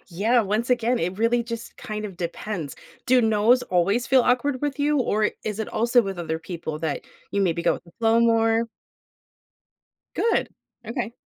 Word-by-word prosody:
yeah, 215 +7 +2
once 215 +4 -1
again, 245 0 +2
it 180 +3 -2
really 235 +2 +2
just 230 0 -7
kind 215 0 -5
of 195 -4 -7
depends. 170 -2 -5 0.3
Do 255 0 +5
"nos" 225 +2 +3
always 200 +7 +1
feel 260 -1 +5
awkward 255 +2 +1
with 290 0 -2
you? 295 +1 +2
Or 215 -4 +1
is 210 -1 -3
it 220 - -3
also 240 +2 +3
with 195 -3 -5
other 160 -2 -3
people 160 -2 -6
that 160 -3 -2 0.3
you 200 - 0
maybe 170 -3 0
go - - +3
with - - -10
the 170 - -18
flow 225 0 +3
more? 225 0 +3 1.5
Good. 465 - +1 0.4
Okay. 235 -1 -3
225 Hz, 175 wpm, -24 LUFS, 190-240 Hz, 1.5 s, Do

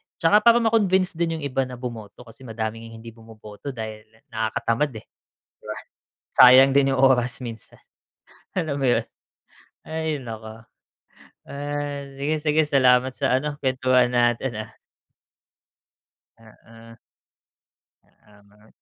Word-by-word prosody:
tsaka 170 +6 +4
para 235 +2 +4
ma-convince 190 -5 +2
din 165 -1 -1
yung 155 - -8
iba 135 -2 -1
na 125 - -8
bumoto 120 -2 -8
kasi 120 +2 -15
madaming 115 0 -6
hindi 115 +1 -11
bumoboto 110 +3 -11
dahil 110 -1 -7 0.2
nakakatamad, 115 +4 -1
eh, 110 - -9 0.4
di - - -47
ba? - - -6 0.6
Sayang 130 +2 +8
din 135 -1 +3
yung 130 - 0
oras 125 -2 +2
minsan. 115 -4 -10 0.7
Alam 160 -6 -2
mo 135 - -3
yun? - - +1 0.8
Ay 160 -3 -4
naku. 110 -1 -9 0.9
Ah, 145 0 -4 0.2
sige, 150 +3 0
sige 155 0 +2
salamat 130 -2 +3
sa 130 - +1
ano, 150 +1 -4
kuwentuhan 130 -1 +2
natin 120 +1 +1
ah. 110 - -20 1.7
Mm. 115 +1 -17 1.3
Tama. 105 +1 -23
125 Hz, 120 wpm, -23 LUFS, 115-145 Hz, 1.7 s, Sayang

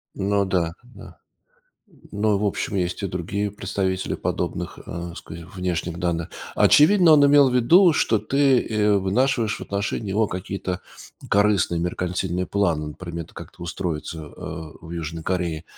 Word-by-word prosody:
Ну 100 0 +1
да, 85 -3 0
да. 125 - -14 0.9
Ну, 105 0 +1
в 105 - 0
общем, 100 0 -2
есть 90 +1 -2
и 100 - 0
другие 100 +4 -3
представители 95 -1 -2
подобных, - - -3
э, 85 0 -6
ска 80 - -9 0.2
внешних 90 -2 -3
данных. 85 -2 -1 0.3
Очевидно, 170 +2 +6
он 145 -2 +7
имел 140 -1 +6
в - - -3
виду, 170 +9 +6
что 110 - +2
ты, 135 +2 +3
э, 105 -2 +2
вынашиваешь 115 +3 +1
в - - -12
отношении 100 +1 -3
него 105 +2 +1
какие-то 90 0 -4 0.5
корыстные 100 -4 +2
меркантильные 90 +1 -2
планы, 85 -7 0
например, 85 +1 -7
т - - -21
как-то - - -11
устроиться, 85 -2 -4
э, 80 +1 -8
в 80 - -10
Южной 80 -1 -5
Корее. 85 -3 -2
95 Hz, 150 wpm, -23 LUFS, 85-105 Hz, 0.9 s, он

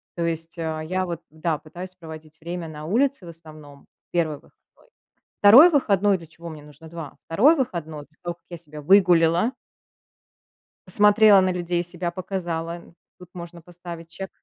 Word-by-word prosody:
То 170 -1 -2
есть, 165 +1 -4
а, 160 -1 -3
я 185 +4 -2
вот 170 -2 -5
да, 160 0 -2
пытаюсь 180 +4 -10
проводить 155 -2 -12
время 170 0 -6
на 150 0 -9
улице 255 - 0
в - - -9
основном, 155 -4 -14 0.3
1 160 -3 0
выходной. - - -23 0.9
2 250 +12 +9
выходной 205 - +2
для 165 - -13
чего 170 +1 -11
мне 150 -2 -10
нужно 150 +2 -15
2. 165 -4 -9
2 255 - +4
выходной, 160 - -4
после 160 - -36
того 175 -1 -4
как - - -43
я 175 - -7
себя 150 -2 -12
выгуляла 175 - +4 1.3
посмотрела 210 +1 +6
на 185 0 +1
людей, 175 -1 -2
себя 175 0 -5
показала, 170 -2 -4 0.4
тут 180 -1 -14
можно 170 -1 -10
поставить 170 0 -11
check, 190 - -5
170 Hz, 160 wpm, -23 LUFS, 160-185 Hz, 1.3 s, 2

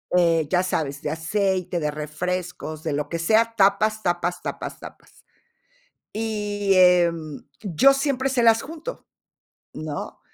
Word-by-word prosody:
eh 165 -3 +3
ya 180 0 +2
sabes, 145 -6 -2
de - - -3
aceite, 180 +2 -1
de 150 -2 -1
refrescos, 155 +1 -4
de 155 - -2
lo 145 0 -2
que 170 - -3
sea, 225 +6 +3
tapas, 210 +2 +3
tapas, 175 0 -1
tapas, - - -6
tapas. - - -14 0.9
Y, 210 -2 -1
em, 170 -4 +3 0.2
yo 210 - +4
siempre 270 -1 0
se 250 -3 +1
las 225 0 +5
junto, 325 - -8 0.7
¿no? 155 -2 -6
180 Hz, 135 wpm, -23 LUFS, 160-215 Hz, 0.9 s, las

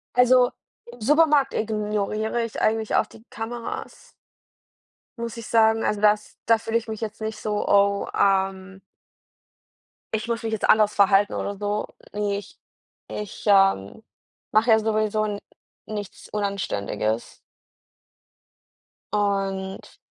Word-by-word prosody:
Also, 250 0 +5 0.3
im 240 -1 -14
Supermarkt 295 +1 +4
ignoriere 215 +1 -1
ich 230 - -5
eigentlich 220 0 +1
auch 220 - +3
die 220 - -16
Kameras 230 +1 -6 1.1
muss 235 0 -5
ich 230 - -7
sagen. 225 0 +3
Also, 210 -1 0
das 210 0 +2
da 230 0 +5
fühle 225 +1 -1
ich 230 0 -5
mich 220 -1 -5
jetzt 215 0 -5
nicht 220 0 -3
so: 210 -1 -2
„Oh, 200 0 +3
ähm“ 190 -1 +1 1.4
„ich 220 +1 -3
muss 230 0 -2
mich 225 - -2
jetzt 215 - -1
anders 215 -1 +5
verhalten 200 0 +4
oder 200 -1 -3
so.“ 205 +1 -2 0.3
Ne, 205 -1 -1
ich 205 - -11 0.5
ich, 210 -2 -7
ähm, 195 - +3 0.5
mache 220 +3 +3
ja 220 - +6
sowieso 215 -1 0
n 205 -1 -3 0.5
nichts 210 -2 -7
Unanständiges. 180 - -2 1.8
Und 195 -2 -2
215 Hz, 125 wpm, -24 LUFS, 200-225 Hz, 1.8 s, ja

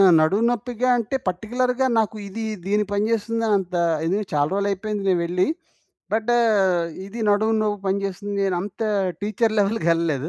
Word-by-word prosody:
ఆ! - - +7 0.2
నడుము 195 +9 +2
నొప్పిగా 245 +1 -2
అంటే, 235 +3 -1
పార్టిక్యులర్‌గా 250 +8 0
నాకు 220 0 0
ఇది 225 +3 -5 0.2
దీని 210 +1 +2
పని 205 +1 +1
చేస్తుందనంత 215 -4 0 0.3
ఇది 190 +4 +1
చాలా 145 -1 +2
రోజులైయిపోయింది 200 +1 -1
నేను 180 -2 +3
వెళ్ళి. 180 +2 +1 0.7
బట్ 220 +2 +1 0.7
ఇది 225 +4 -7
నడుము 215 +2 +3
నొప్పి 205 -1 -1
పనిచేస్తుంది 200 +1 -2
నేనంత 195 +2 -2 0.4
టీచర్ 215 +2 0
లెవెల్‌కెళ్ళలేదు. 170 - +1
205 Hz, 135 wpm, -23 LUFS, 190-225 Hz, 0.7 s, ఆ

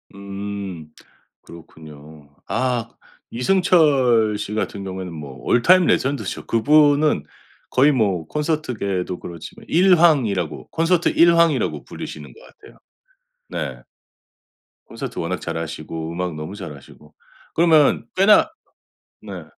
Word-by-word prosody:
음 100 -4 -7 0.5
그렇군요. 75 -2 -14 0.2
아 120 +3 -1 0.4
이승철 130 - +3
씨 105 0 -5
같은 105 -2 -3
경우에는 95 -2 -6
뭐 75 -4 -8
올 120 - +2
타임 185 +6 +5
레전드죠. 135 -11 -1
그분은 145 - +3 0.5
거의 140 +4 +4
뭐 100 - 0
콘서트계에도 120 - -2
그렇지만 85 -2 -10
1 180 +2 +4
황이라고 110 - +1
콘서트 170 +1 +1
1 170 0 +4
황이라고 170 -2 +1
불리시는 - - -9
것 - - -18
같아요. - - -18 0.7
네. - - -5 1.1
콘서트 120 +3 -7
워낙 85 +2 -3
잘하시고 80 0 -5
음악 90 -1 -3
너무 75 +6 -7
잘하시고. 75 -4 -12 0.4
그러면 160 -3 +4
꽤나 210 +10 +5 0.7
네. - - -8
105 Hz, 255 characters per minute, -21 LUFS, -, 1.1 s, 타임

